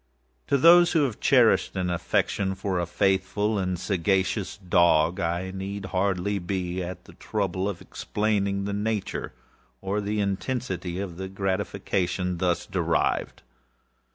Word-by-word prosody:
To 140 - +3
those 170 +4 +7
who 160 -3 +4
have 125 -6 -2
cherished - - +4
an 90 -1 -1
affection 95 +3 0
for 95 -1 -2
a 85 - -1
faithful 95 +3 +1
and 90 -1 -1
sagacious 95 +2 0
dog, 85 -2 +3
I 85 +1 -1
need 95 +1 -5
hardly 100 +1 0
be 90 0 -3
at 90 0 -6
the - - -14
trouble 95 -2 -2
of 100 - -6
explaining 100 -2 -1
the 100 - -2
nature 105 0 -2 0.5
or 100 +2 -2
the 105 +1 -2
intensity 95 -3 -2
of 95 -4 -5
the 95 0 -4
gratification 95 -2 -2
thus 90 -1 0
derivable. - - -1
95 Hz, 135 wpm, -26 LUFS, 90-100 Hz, 0.5 s, those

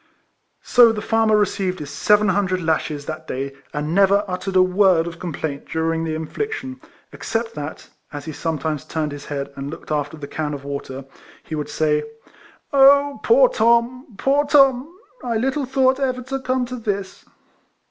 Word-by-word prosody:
So 240 -2 +6
the 220 - -4
farmer 220 0 +2
received 190 -2 0
his 145 -3 -7
seven 210 -1 +3
hundred 190 -1 +1
lashes 155 -3 -1
that 155 +1 -7
day, 135 +1 -4 0.2
and 150 +2 -3
never 200 +2 +4
uttered 185 +1 -4
a 185 - +6
word 185 -2 +3
of 170 0 -7
complaint 155 -4 -5
during 165 0 -1
the 160 -1 -2
in 160 0 -4
fliction, 270 - -5 0.3
except 225 0 -3
that, 150 0 -7 0.2
as 145 -1 -7
he 160 - -5
sometimes 155 -1 -3
turned 155 -2 -3
his 145 0 -8
head, 140 -1 -5
and 140 0 -5
looked 155 - -9
after 150 +1 -2
the 145 -2 -8
can 150 -1 -3
of 140 - -9
water, 140 -1 -6 0.4
he - - -9
would 150 -1 -3
say, 150 -1 +1 0.4
" - - -27
Oh! 280 +1 +5
poor - - +5
Tom! 235 - +1
poor 280 +2 +2
Tom! 275 -1 +4 0.3
I 235 -2 -1
little 270 +4 -1
thought 265 0 +2
ever 255 -2 -1
to 270 +2 -4
come 255 -1 -1
to 250 +1 -6
this 200 -4 -4
190 Hz, 180 wpm, -21 LUFS, 155-250 Hz, 0.4 s, So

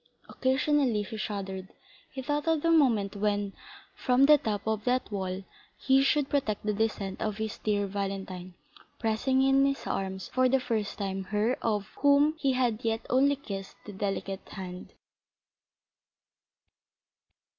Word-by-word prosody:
Occasionally 265 -4 +1
he 205 - -7
shuddered; 195 -2 -4 0.4
he 265 - -6
thought 295 +3 -1
of 320 -2 +2
the 335 - +3
moment 230 -11 +3
when, 205 -1 0 0.4
from 255 +2 +3
the 300 0 +7
top 210 -4 -2
of 220 -1 -1
that 250 -2 0
wall, 190 -1 -3 0.3
he 270 0 +4
should 275 +1 +2
protect 220 -9 -1
the 210 - +1
descent 205 -2 -2
of 215 -2 -2
his 220 -1 -4
dear 205 -1 0
Valentine, 195 -2 -5 0.4
pressing 250 +4 +1
in 270 0 +4
his 275 0 0
arms 190 -1 -3
for 255 0 +2
the 265 +1 +3
first 225 -5 -2
time 195 -1 -3
her 215 +5 +1
of 210 -3 0
whom 285 +2 +5
he 275 -4 +2
had 245 -3 0
yet 225 0 -1
only 275 +3 +4
kissed 195 -8 -7
the 210 - -8
delicate 195 0 -3
hand. 180 -1 -8
220 Hz, 145 wpm, -29 LUFS, 200-265 Hz, 0.4 s, the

